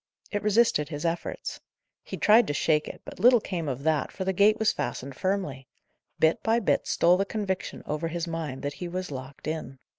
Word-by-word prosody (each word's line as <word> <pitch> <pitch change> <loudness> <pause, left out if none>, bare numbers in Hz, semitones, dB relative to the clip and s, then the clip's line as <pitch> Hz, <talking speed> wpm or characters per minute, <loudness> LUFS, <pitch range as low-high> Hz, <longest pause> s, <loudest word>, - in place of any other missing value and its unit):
It 205 - -1
resisted 210 -8 +3
his 150 +1 -5
efforts. 170 +1 -3 0.4
He - - -7
tried 220 +3 +5
to 145 - -1
shake 150 +1 +2
it, - - -9
but - - -10
little 245 0 +6
came 170 -7 -3
of 135 +1 -4
that, 155 -2 +1
for 190 - -5
the 190 - +1
gate 205 +3 +5
was 220 -1 +3
fastened 130 +2 -4
firmly. 170 -9 -2 0.5
Bit 160 0 +3
by 225 +1 +2
bit 210 - +1
stole 175 +2 +4
the 195 - +2
conviction 200 -2 -3
over 150 +2 -2
his 170 +1 -3
mind 160 -5 -4
that 145 0 -2
he 180 - -2
was 185 -1 -4
locked 130 +1 -8
in. 155 -4 -4
170 Hz, 205 wpm, -27 LUFS, 145-200 Hz, 0.5 s, little